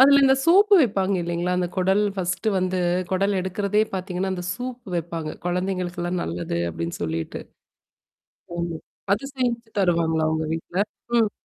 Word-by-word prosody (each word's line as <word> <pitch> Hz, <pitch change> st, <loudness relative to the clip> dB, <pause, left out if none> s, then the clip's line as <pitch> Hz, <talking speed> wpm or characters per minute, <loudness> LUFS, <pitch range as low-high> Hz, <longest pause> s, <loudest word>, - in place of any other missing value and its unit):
அதுல 280 Hz, +1 st, +8 dB
இந்த 265 Hz, 0 st, +6 dB
சூப்பு 400 Hz, +4 st, +6 dB
வைப்பாங்க 195 Hz, -7 st, +2 dB
இல்ல்லலைங்களா? 175 Hz, +1 st, -1 dB
அந்த 180 Hz, -, +1 dB
குடல் 190 Hz, +3 st, +3 dB
ஃபர்ஸ்ட்டு 190 Hz, +3 st, -1 dB
வந்து 185 Hz, 0 st, 0 dB, 0.3 s
குடல் 195 Hz, +1 st, +2 dB
எடுக்கிறதே 200 Hz, +3 st, +1 dB
பாத்தீங்கன்னா, 185 Hz, 0 st, -2 dB
அந்த 180 Hz, -, -5 dB
சூப்பு 250 Hz, -3 st, -6 dB
வைப்பாங்க. 165 Hz, -2 st, -3 dB
கொழந்தைங்களுக்கெல்லாம் 180 Hz, -1 st, -1 dB
நல்லது 85 Hz, 0 st, -3 dB
அப்படின்னு 85 Hz, +1 st, -4 dB
சொல்லிட்டு. 80 Hz, 0 st, -3 dB, 1.2 s
ஆமா 170 Hz, -1 st, -2 dB, 0.3 s
அது 210 Hz, +7 st, +1 dB
செஞ்ச்சு 240 Hz, -2 st, -1 dB
தருவாங்களா 165 Hz, -4 st, +2 dB
உங்க 160 Hz, 0 st, 0 dB
வீட்ல. 170 Hz, +4 st, -2 dB, 0.4 s
ம். 220 Hz, -3 st, +3 dB
185 Hz, 135 wpm, -24 LUFS, 170-210 Hz, 1.2 s, அதுல